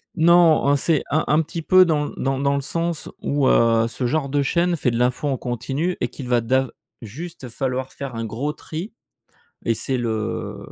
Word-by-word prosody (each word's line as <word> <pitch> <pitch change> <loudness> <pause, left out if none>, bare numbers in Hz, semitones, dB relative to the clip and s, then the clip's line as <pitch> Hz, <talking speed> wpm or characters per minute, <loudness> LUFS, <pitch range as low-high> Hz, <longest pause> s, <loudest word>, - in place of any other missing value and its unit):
Non, 170 0 +5 0.3
en 140 +1 +4
c'est 150 +1 +1
un 155 +2 +1
un 150 +2 +4
petit 165 +2 -5
peu 185 +3 +6
dans 150 -3 +1
l - - -9
dans 135 0 -1
dans 140 0 +1
le 140 - -1
sens 165 +3 -3
où, 140 -2 +1
heu, 115 0 +4
ce 125 +2 -4
genre 140 0 -1
de 145 +1 +1
chaîne 175 +5 +1
fait 130 -6 0
de 115 - -2
l'info 125 +4 0
en 135 -2 0
continu 135 +8 -2
et 125 - 0
qu'il 130 +1 -8
va 120 -1 +2
d'av 130 +2 +1 0.3
juste 135 +4 -8
falloir 130 +1 -3
faire 135 -4 -6
un 115 - -3
gros 130 +7 -3
tri 165 +9 -7 0.7
et 115 - +2
c'est 130 +4 -2
le 110 -3 -3
135 Hz, 205 wpm, -22 LUFS, 125-155 Hz, 0.7 s, peu